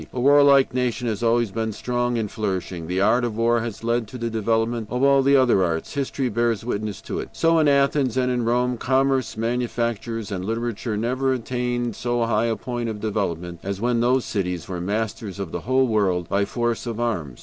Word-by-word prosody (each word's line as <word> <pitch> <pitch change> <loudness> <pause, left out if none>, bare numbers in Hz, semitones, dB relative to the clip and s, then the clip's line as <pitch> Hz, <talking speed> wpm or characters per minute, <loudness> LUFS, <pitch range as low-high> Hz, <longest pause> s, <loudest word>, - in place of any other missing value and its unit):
A 125 - -4
warlike 140 -1 +5
nation 125 -1 -1
has 110 -1 -3
always 115 -2 +2
been 110 +1 -2
strong 120 +2 -1
and 110 -3 -2
flourishing. 95 -6 -3
The 90 +2 -1
art 115 +5 +3
of 115 -3 -2
war 115 +1 +3
has 115 -1 -5
led 115 -1 0
to 125 - -8
the 115 -1 -3
development 115 +1 0
of 125 +2 -1
all 140 0 +5
the 140 +1 +4
other 125 -8 +4
arts. 80 -2 -2
History 140 -2 -1
bears 115 -1 0
witness 105 -3 -3
to - - -4
it. - - -6
So 165 0 +3
in 155 - +3
Athens 140 -3 +2
and 125 -1 +2
in 125 -1 0
Rome, 125 +1 +1
commerce, 130 -2 +1
manufactures, 115 -2 -2
and 95 -2 -3
literature 115 +1 -2
never 130 +4 0
attained 120 -2 -2
so 120 -1 0
high 115 0 +1
a 115 - 0
point 120 -1 -4
of 110 -1 -5
development 90 -5 -3
as 100 0 -4
when 120 +1 +1
those 125 +2 +2
cities 90 -5 -3
were 90 -2 -4
masters 105 0 -3
of 95 -4 -4
the - - -4
whole 130 0 +4
world 95 -7 +1
by 100 +1 +1
force 120 +2 -2
of 115 -1 -4
arms. 85 - -2
115 Hz, 205 wpm, -23 LUFS, 105-125 Hz, -, warlike